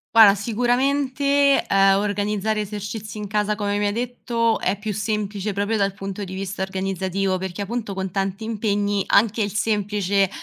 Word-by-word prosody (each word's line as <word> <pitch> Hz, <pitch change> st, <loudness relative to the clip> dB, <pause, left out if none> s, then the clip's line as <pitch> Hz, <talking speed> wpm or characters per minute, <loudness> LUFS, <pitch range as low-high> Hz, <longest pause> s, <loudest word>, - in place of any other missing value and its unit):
Guarda 210 Hz, -3 st, +9 dB
sicuramente, 270 Hz, +5 st, +2 dB
ehm, 195 Hz, 0 st, +4 dB
organizzare 210 Hz, +1 st, -1 dB
esercizi 210 Hz, +1 st, -6 dB
in 210 Hz, -, -4 dB
casa 210 Hz, +1 st, 0 dB
come 205 Hz, -1 st, -1 dB
mi 205 Hz, -, +1 dB
hai -, -, +1 dB
detto 235 Hz, 0 st, -1 dB
è 200 Hz, -, 0 dB
più 210 Hz, +1 st, -4 dB
semplice 210 Hz, -1 st, -2 dB
proprio 205 Hz, +3 st, 0 dB
dal 200 Hz, -2 st, 0 dB
punto 195 Hz, +1 st, -5 dB
di 190 Hz, 0 st, -6 dB
vista 195 Hz, 0 st, -4 dB
organizzativo, 190 Hz, 0 st, -1 dB
perché 190 Hz, +1 st, -4 dB
a -, -, -5 dB
punto, 220 Hz, -2 st, -4 dB
con 190 Hz, -1 st, -3 dB
tanti 195 Hz, +2 st, -2 dB
impegni, 205 Hz, -2 st, 0 dB
anche 220 Hz, +1 st, +3 dB
il 205 Hz, -, 0 dB
semplice 205 Hz, -2 st, +1 dB
205 Hz, 165 wpm, -22 LUFS, 195-220 Hz, -, Guarda